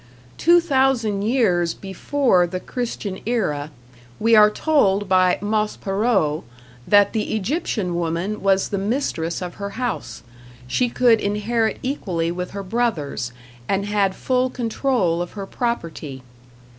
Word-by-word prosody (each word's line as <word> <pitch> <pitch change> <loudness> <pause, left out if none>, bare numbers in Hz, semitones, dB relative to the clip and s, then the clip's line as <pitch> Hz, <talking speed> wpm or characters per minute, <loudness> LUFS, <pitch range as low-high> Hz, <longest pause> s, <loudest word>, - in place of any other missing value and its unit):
Two 345 +1 +6
thousand 265 -10 +1
years 200 -7 +1
before 195 0 +1
the 185 +2 -4
Christian 220 -4 -4
era 155 -12 -1 0.5
we 225 +1 +4
are 210 -1 +8
told 205 -6 +2
by 185 -1 +4
Maspero 205 -5 0 0.4
that 205 -1 +5
the 220 -1 -1
Egyptian 215 - -1
woman 170 +5 -2
was 195 -1 +2
the 200 - -2
mistress 195 - -2
of 175 -1 -7
her 200 0 -5
house; 225 - -4 0.4
she 245 - 0
could 235 -2 +3
inherit 220 +2 0
equally 180 - -2
with 180 +1 -4
her 200 0 -6
brothers, 185 - -2 0.4
and 200 0 +1
had 200 -2 +1
full 255 0 0
control 230 -7 0
of 175 - -5
her 200 -2 -5
property. 165 - -4
205 Hz, 130 wpm, -22 LUFS, 180-240 Hz, 0.5 s, are